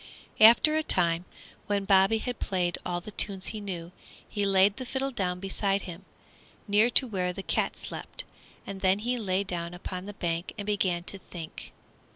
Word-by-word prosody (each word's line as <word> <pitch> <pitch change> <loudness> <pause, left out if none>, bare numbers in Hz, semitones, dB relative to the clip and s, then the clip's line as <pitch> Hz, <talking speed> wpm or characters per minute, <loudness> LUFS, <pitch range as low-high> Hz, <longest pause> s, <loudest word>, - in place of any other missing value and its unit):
After 235 +8 +7
a 315 - +3
time, 175 - +1 0.4
when 200 -1 0
Bobby 195 +2 +5
had 245 +2 -4
played 180 -2 -1
all 175 0 -2
the 215 - -9
tunes 195 -2 +1
he 215 - -5
knew, 175 -4 -5 0.4
he 205 -1 -1
laid 195 +1 +4
the 260 - -4
fiddle 270 +1 -1
down 180 -6 -2
beside 195 +1 0
him, 180 +1 -8 0.6
near 210 +3 +4
to 260 - +5
where 185 -6 -1
the 190 +2 -7
cat - - 0
slept, - - -7 0.4
and 195 -1 -7
then 190 0 +3
he 245 +4 -1
lay 195 -2 0
down 175 -2 -5
upon 185 +1 -6
the 205 - -8
bank 170 -2 -3
and 205 - -5
began 190 -4 0
to 195 +2 -4
think. 170 -3 -9
195 Hz, 185 wpm, -28 LUFS, 180-210 Hz, 0.6 s, After